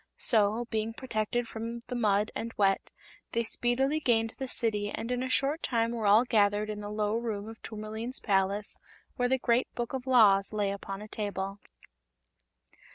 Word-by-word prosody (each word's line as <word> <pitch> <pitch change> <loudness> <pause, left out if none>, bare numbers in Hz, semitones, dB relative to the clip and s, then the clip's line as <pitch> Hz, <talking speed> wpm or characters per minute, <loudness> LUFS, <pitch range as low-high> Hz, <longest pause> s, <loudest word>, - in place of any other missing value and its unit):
So, 220 0 +2
being 220 0 -1
protected 235 -1 -2
from 230 +1 -5
the 250 - -6
mud 210 -3 +2
and 230 - -4
wet, 195 -1 +2 0.4
they 235 -1 +1
speedily 260 +6 +1
gained 225 -5 +2
the 265 - -3
City 210 -4 -1
and 230 +3 -4
in 250 0 0
a 260 - -2
short 280 +5 +1
time 230 -2 +1
were 225 -3 -1
all 215 +5 +6
gathered 210 -2 +2
in 210 0 -5
the 205 - -5
low 210 0 -1
room 220 -3 -3
of 225 0 -10
Tourmaline's 220 +3 -6
palace, 200 +1 0 0.4
where 245 -1 +1
the 265 - +3
Great 245 0 +1
Book 240 +1 -3
of 265 0 -4
Laws 210 -6 +5
lay 205 -2 0
upon 195 0 -6
a - - -9
table. 200 -2 -4
225 Hz, 175 wpm, -30 LUFS, 205-240 Hz, 0.4 s, all